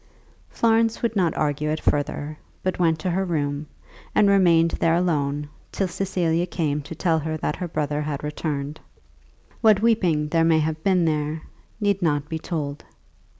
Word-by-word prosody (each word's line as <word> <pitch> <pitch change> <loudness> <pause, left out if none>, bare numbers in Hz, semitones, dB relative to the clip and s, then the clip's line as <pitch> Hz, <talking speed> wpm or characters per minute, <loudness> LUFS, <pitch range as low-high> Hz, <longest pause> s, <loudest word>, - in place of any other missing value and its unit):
Florence 225 0 +2
would 230 -1 0
not 180 -5 +1
argue 150 0 0
it 155 +1 -1
further, 145 +1 -1 0.3
but 185 0 -1
went 165 -2 +3
to 175 +3 -2
her 190 +3 0
room, 150 -4 -2 0.5
and 210 - +5
remained 170 -4 +4
there 165 0 +2
alone 150 -4 0 0.2
till 195 - -1
Cecilia 175 -2 0
came 150 -4 -1
to 150 +3 -8
tell 165 -1 +1
her 155 +1 -3
that 150 - -2
her 180 - -3
brother 150 -2 -2
had 150 -1 -4
returned. 150 0 -3 0.8
What 215 -2 +5
weeping 175 -10 +2
there 165 +1 +2
may 165 -1 +4
have 155 0 -1
been 185 -3 +3
there, 155 0 -1 0.4
need 200 -2 +1
not 150 -3 0
be 160 - -3
told. 150 -4 -4
160 Hz, 165 wpm, -24 LUFS, 150-180 Hz, 0.8 s, and